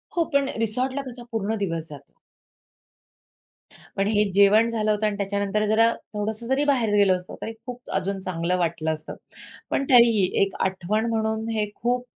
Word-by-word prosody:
हो, 340 - +3
पण 280 -1 +2
रिसॉर्टला 255 +5 -1
कसा 245 -1 -8
पूर्ण 220 0 -1
दिवस 165 -3 -4
जातो. 140 -2 -12 1.8
पण 195 +1 +1
हे 210 -1 +3
जेवण 200 +3 +5
झालं 220 -2 0
होतं 210 0 0
आणि 205 - -2
त्याच्यानंतर 200 +1 -1
जरा, 225 +2 +4 0.2
थोडंसं 215 +2 -3
जरी 265 +2 +1
बाहेर 245 -7 +2
गेलो 200 -2 +5
असतो, 180 0 -10
तरी 225 - -4
खूप 245 0 -9
अजून 195 +1 -2
चांगलं 180 -1 -1
वाटलं 165 -2 -1
असतं. 155 0 -8 0.5
पण 275 - 0
तरीही 235 -5 +6 0.2
एक 195 -1 +1
आठवण 190 +4 -1
म्हणून 220 0 -1
हे 210 -1 0
खूप 245 +1 -1
215 Hz, 160 wpm, -24 LUFS, 195-230 Hz, 1.8 s, तरीही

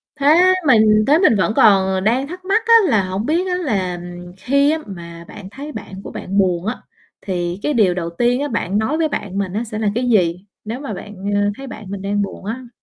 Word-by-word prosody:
Thế 280 -1 -4
á, 360 +4 +6
mình 215 -4 +5
thế 295 - +5
mình 365 - +4
vẫn 190 +1 +1
còn, 195 -3 +5
ờ, 190 0 0
đang 235 +8 0
thắc 365 +3 -9
mắc 415 +4 +1
á, 460 - +5 0.2
là 215 -6 +3
hổng 190 +3 -3
biết 340 +6 0
á 360 - 0
là, 200 - -1
ừm, 175 0 -9
khi 280 +8 +2
á 320 - 0
mà 170 -3 -9
bạn 200 -2 -10
thấy 280 +8 -8
bạn 190 -8 -8
của - - -8
bạn 195 +2 -5
buồn 180 -3 +1
á, 220 +4 -3 0.4
thì 175 -1 -3
cái 295 - 0
điều 210 -8 +3
đầu 170 -2 -3
tiên 245 +2 +2
á, 290 - -1
bạn 210 -6 -2
nói 240 +9 0
với 320 -2 +1
bạn 195 -7 -4
mình 195 -2 -2
á, 220 - -1
sẽ 215 -2 -6
là 215 -2 +1
cái 245 +2 0
gì? 180 -3 +1 0.2
Nếu 225 +4 -5
mà 275 -7 -5
bạn, 210 +2 -9 0.2
à, 205 0 +2
thấy 270 0 -8
bạn 215 -3 -9
mình 195 -1 -5
đang 205 +1 -1
buồn 195 -1 -6
á. 240 +4 -5
215 Hz, 255 wpm, -19 LUFS, 190-275 Hz, 0.4 s, á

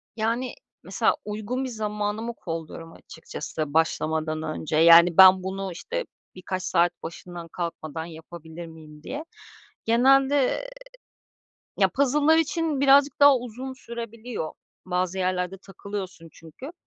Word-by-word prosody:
Yani, 230 +3 -2 0.3
mesela - - +1
uygun 215 +5 -3
bir 260 - -3
zamanımı 210 0 -3
kolluyorum 165 -3 -7
açıkçası, 155 -2 -7
başlamadan 155 -1 0
önce. 155 0 -4
Yani 170 +1 +7
ben 190 -1 +8
bunu, 190 0 -4
işte - - -5 0.3
birkaç 185 0 -5
saat 175 -1 +2
başından 170 +1 -8
kalkmadan 165 -2 -5
yapabilir 165 0 -10
miyim 155 -2 -14
diye. 305 +3 -6 0.6
Genelde, 270 - +3 1.1
ya - - +4
puzzle'lar 295 +3 +3
için 325 -2 0
birazcık 280 +1 +4
daha 285 -1 +8
uzun 250 +2 -7
sürebiliyor. 235 -6 -7 0.3
Bazı 180 0 -1
yerlerde 185 0 -1
takılıyorsun 195 -3 -7
çünkü 165 - -11
190 Hz, 115 wpm, -25 LUFS, 165-250 Hz, 1.1 s, ben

